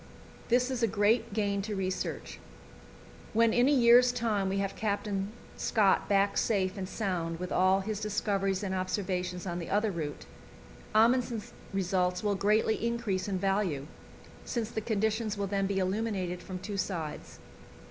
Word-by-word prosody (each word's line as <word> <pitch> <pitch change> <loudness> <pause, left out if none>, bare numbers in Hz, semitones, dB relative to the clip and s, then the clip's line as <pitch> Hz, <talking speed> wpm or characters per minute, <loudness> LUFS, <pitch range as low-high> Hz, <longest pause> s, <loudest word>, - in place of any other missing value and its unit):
This 250 +2 +3
is 250 -2 -2
a 230 - +4
great 220 +3 +2
gain 200 -1 0
to 210 +1 -4
research. 190 -1 -3 0.9
When 230 0 +4
in 245 +2 +4
a - - +4
year's 245 -2 +6
time 220 -5 0
we 195 - -1
have 195 0 -2
Captain 205 -1 -2 0.3
Scott 210 -4 +2
back 200 0 +3
safe 190 -4 +1
and 190 -2 -5
sound 175 -6 -2
with 180 0 -5
all 185 +1 +3
his 210 +1 -3
discoveries 200 -2 -1
and 190 -1 -2
observations 185 -1 -2
on 175 -1 -3
the 170 - -6
other 210 +2 +1
route, 155 -5 -5 0.7
Amundsen's 235 0 +2 0.2
results 180 -1 0
will 205 -1 +2
greatly 210 +3 +2
increase 235 -5 -1
in 195 -2 -1
value, 195 -7 0 0.6
since 235 -2 -3
the 220 - -2
conditions 220 0 -1
will 200 - -1
then 195 0 0
be 200 0 -1
illuminated 190 -2 -1
from 185 - -6
two 200 +2 -5
sides. 170 -5 -4
200 Hz, 160 wpm, -30 LUFS, 185-220 Hz, 0.9 s, year's